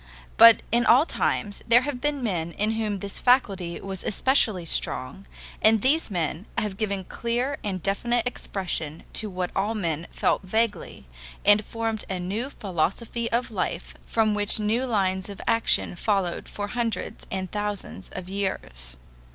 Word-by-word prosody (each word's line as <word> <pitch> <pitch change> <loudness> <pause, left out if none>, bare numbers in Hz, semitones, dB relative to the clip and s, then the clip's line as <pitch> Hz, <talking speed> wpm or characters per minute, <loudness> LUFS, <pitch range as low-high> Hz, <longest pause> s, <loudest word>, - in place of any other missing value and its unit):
But 230 -1 +8
in 240 +1 +3
all 265 +6 +7
times 205 -10 -1
there 235 +1 +7
have 260 -2 -4
been 295 -3 -1
men 170 -6 -2
in 210 +2 0
whom 220 -2 -1
this 200 -1 -5
faculty 195 -9 +2
was 195 -2 -7
especially 215 -6 +2
strong, 160 +3 -1 0.3
and 220 0 +5
these 300 +3 +2
men 175 0 -2
have 210 -3 -1
given 200 -3 -1
clear 240 +8 -2
and 190 -4 -3
definite 235 +4 0
expression 175 - -3
to 215 - 0
what 180 -1 -3
all 205 +4 0
men 170 -5 -2
felt - - +1
vaguely, 210 - -2 0.4
and 205 +1 +6
formed 225 -1 -3
a 190 - -2
new 205 +9 -3
philosophy 220 - -2
of 240 +1 0
life - - -3
from 220 -2 +2
which 205 +1 +3
new 225 +5 0
lines 190 -4 0
of 200 - -8
action 225 -5 +2
followed 195 -2 -1
for 205 0 -5
hundreds 230 -3 -3
and 185 -1 -4
thousands 205 - -4
of 185 -1 -6
years. 65 - -4
205 Hz, 155 wpm, -25 LUFS, 185-230 Hz, 0.4 s, But